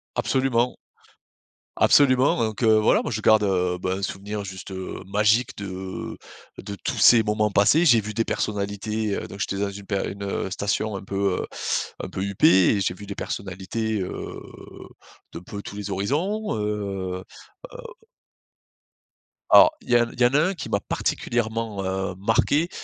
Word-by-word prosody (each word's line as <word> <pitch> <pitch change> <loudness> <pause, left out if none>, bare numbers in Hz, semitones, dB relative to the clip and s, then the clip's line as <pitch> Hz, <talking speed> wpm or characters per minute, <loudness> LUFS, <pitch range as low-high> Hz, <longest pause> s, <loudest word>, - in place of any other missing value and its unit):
Absolument. 125 -2 +1 1.0
Absolument, 130 -2 +4
donc, 110 0 -2
heu, 110 -1 +5
voilà 105 - +3
moi - - -4
je - - -2
garde, 110 -1 +5
heu, 90 -2 +1
ben 95 +1 -2
un - - -7
souvenir 100 +2 -4
juste, 95 0 -8
heu, 95 -1 -6
magique 105 +5 +2
de 95 -1 -6 0.4
de 100 - -7
tous - - -2
ces 115 -2 +7
moments 105 0 0
passés. 110 - +4
J'ai 120 -8 +6
vu 105 +1 -6
des 115 +1 0
personnalités, 105 +1 -2
heu - - -5
donc 100 - -10
j'étais 100 - -2
dans 100 - -1
une 100 0 -10
per 100 0 -1
une, 100 0 -8
heu, 100 -1 -3
station 100 +2 -1
un 95 - -9
peu, 100 -1 -1
heu - - -4 0.6
un - - -5
peu - - -5
huppée. 95 -1 +4
Et - - -1
j'ai 90 - 0
vu 100 +3 -11
des 100 0 -6
personnalités, 100 +3 -3
heu, 90 - -6 0.9
d'un 85 - -7
peu 100 +3 -8
tous 100 - -9
les 105 0 -5
horizons. 155 - -1
Heu 100 -3 -3 0.5
heu - - -9 1.7
Alors, 310 - +8
il - - -17
y 120 0 +5
en 120 - +2
il 125 - -9
y - - +7
en 125 - +2
a - - +5
un - - -2
qui 180 - -7
m'a 100 - +1
particulièrement, 110 -1 -2
heu, 95 0 -2
marqué. 125 - +2
105 Hz, 175 wpm, -24 LUFS, 95-115 Hz, 1.7 s, Alors